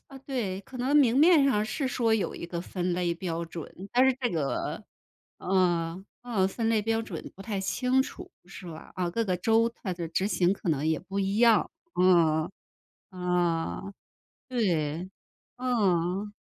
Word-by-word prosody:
啊， 270 -1 -11
对， 210 -9 -2
可 255 - -11
能 270 +4 +2
明 255 -4 +5
面 315 -2 +6
上 215 -6 +2
是 260 +6 -2
说 235 -3 +1
有 215 - -1
一 170 - -6
个 170 -1 -4
分 180 0 -2
类 175 -1 0
标 170 -1 -3
准， 170 +3 -9
但 250 +2 +5
是 265 - +5
这 245 - +1
个 150 -5 -2 0.6
呃 180 -1 0 0.2
呃， 210 -6 +1
分 225 +3 -2
类 220 -2 +2
标 225 +1 +1
准 175 -7 -7
不 195 - -9
太 205 -3 -3
清 255 +7 +1
楚 360 +6 -9 0.2
是 180 0 -10
吧？ 160 -2 -9
啊， 180 -2 -1
各 230 +4 0
个 185 -3 0
州 225 +5 +3
它 190 -5 -2
的 170 -2 -5
执 185 +4 0
行 185 -3 +2
可 185 - -5
能 150 -1 +1
也 160 -1 +1
不 195 +1 -4
一 195 +1 0
样， 230 -2 +5 0.2
啊， 170 -3 +3 0.6
啊， 180 +1 -1 0.6
对， 175 - 0 0.5
嗯。 205 -5 0
190 Hz, 180 characters per minute, -28 LUFS, 175-230 Hz, 0.6 s, 面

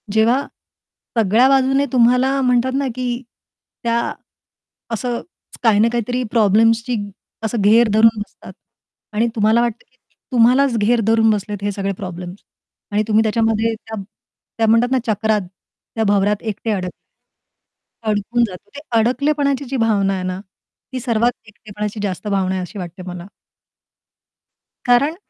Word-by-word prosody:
जेव्हा 230 +5 +3 0.8
सगळ्या 225 +4 +4
बाजूने 270 +1 +3
तुम्हाला 250 +2 +3
म्हणतात 250 0 +2
ना, 280 -1 0
की 250 0 -3 0.6
त्या 235 0 +1 0.9
असं 240 +1 -2 0.4
काही 220 -3 +4
ना 220 - +5
काहीतरी 245 +2 -1
प्रॉब्लेम्सची 225 +2 +3 0.5
असं 220 0 -1
घेर 225 +4 +5
धरून 220 0 +5
बसतात. 205 - -10 0.6
आणि 225 +3 +2
तुम्हाला 220 +2 +3
वाटतं, 235 -1 -2
की 255 - -35 0.3
तुम्हालाच 250 +1 +4
घेर 225 +3 +2
धरून 225 0 +4
बसलेत 205 -1 -2
हे 205 - 0
सगळे 195 0 -2
प्रॉब्लेम्स 180 0 -7 0.5
आणि 210 +1 +1
तुम्ही 220 0 +3
त्याच्यामध्ये 225 0 +1
त्या 220 -1 -8 0.6
त्या 225 -1 +2
म्हणतात 230 +3 +3
ना 260 - +3
चक्रात 215 0 +1 0.5
त्या 225 - +1
भवरात 205 0 +2
एकटे 220 0 -3
अडक 185 -3 -2 1.2
अडकून 215 +3 +1
जातो. 190 +1 -12
ते - - -6 0.2
अडकलेपणाची 280 +3 +1
जी 265 +1 -3
भावना 205 -4 +2
आहे 185 -1 -3
ना 185 0 -3 0.5
ती 255 - -2
सर्वात 235 -1 +1 0.2
एकटेपणाची 210 0 -6
जास्त 195 +1 -3
भावना 195 -2 0
आहे 185 - -2
अशी 180 +3 -7
वाटते 175 0 -7
मला. 175 -1 -7 1.6
कारण 275 +6 +3
225 Hz, 140 wpm, -19 LUFS, 205-245 Hz, 1.6 s, ना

